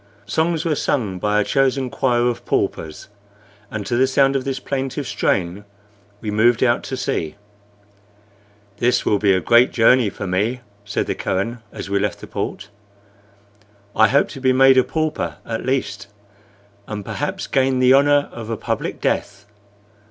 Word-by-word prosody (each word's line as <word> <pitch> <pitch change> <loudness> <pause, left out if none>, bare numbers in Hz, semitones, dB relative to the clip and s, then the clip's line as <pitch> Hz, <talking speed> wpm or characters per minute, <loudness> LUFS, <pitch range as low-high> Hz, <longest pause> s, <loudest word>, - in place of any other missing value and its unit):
Songs 160 0 0
were 165 - +1
sung 110 -10 -1
by 105 +2 +1
a - - +3
chosen 135 +1 +1
choir 120 -4 +1
of 120 - -2
paupers, 80 -1 -2 0.6
and 110 -2 -5
to 120 - -1
the 130 +2 +3
sound 135 +1 +3
of 135 -1 -1
this 135 -1 -2
plaintive 135 +1 -3
strain 100 -3 -1 0.6
we 105 - -3
moved 115 +3 +3
out 120 -2 +2
to 130 - -5
sea. 80 -10 -2 1.4
"This 120 +4 +1
will 105 - +2
be 100 -1 +3
a 95 - +3
great 120 +6 +4
journey 120 -1 +4
for 100 - -7
me," 105 +7 -1 0.2
said 105 - -2
the - - -2
Kohen, 105 +6 -2
as - - -7
we 100 0 0
left 105 +1 -2
the - - -9
port. - - -5 1.3
"I 110 - +6
hope 140 +5 +2
to 135 - -9
be 130 -1 +3
made 135 0 +6
a - - +4
pauper 155 +1 -2
at 115 +2 -4
least, 105 -7 -2 0.8
and 105 -2 -6
perhaps 190 - -3
gain 130 -1 +1
the 130 0 +5
honor 145 +1 +4
of 115 -2 -8
a 115 - -2
public - - -3
death. 105 0 -2
120 Hz, 165 wpm, -20 LUFS, 105-135 Hz, 1.4 s, I